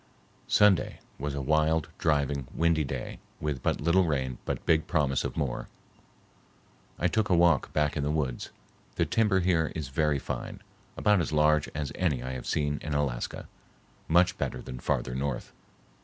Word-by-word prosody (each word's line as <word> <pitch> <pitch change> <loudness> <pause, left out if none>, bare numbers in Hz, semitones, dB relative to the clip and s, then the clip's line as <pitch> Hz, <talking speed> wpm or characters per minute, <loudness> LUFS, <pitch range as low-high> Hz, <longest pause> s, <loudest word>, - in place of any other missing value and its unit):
Sunday 105 -3 +3 0.2
was 70 0 -3
a 70 - -3
wild, 80 +2 +2
driving, 70 -3 +1
windy 85 -1 +2
day 65 - -5 0.2
with 75 -4 -2
but - - 0
little 85 +5 +3
rain 65 -5 -1
but - - -3
big 80 -1 +3
promise 70 -5 +1
of - - -4
more. 65 -4 -2 1.3
I 85 - +2
took 110 +4 0
a 90 - +4
walk 85 -5 +3
back 75 -1 +1
in 75 - -1
the 70 - -1
woods. 75 -5 -2 0.5
The - - +2
timber 105 -4 +2
here 85 -3 +2
is 75 -5 -4
very 75 +1 +1
fine, - - -6 0.3
about 105 -3 +3
as 85 - -2
large 75 0 +3
as 75 -2 -3
any 75 -9 0
I 65 - -4
have 65 -1 -6
seen 75 -1 0
in 75 -2 -3
Alaska, 70 -5 -2 0.6
much 85 +2 +3
better - - -2
than 65 - -8
farther 65 - -1
north. 70 0 -3
75 Hz, 170 wpm, -28 LUFS, 70-85 Hz, 1.3 s, a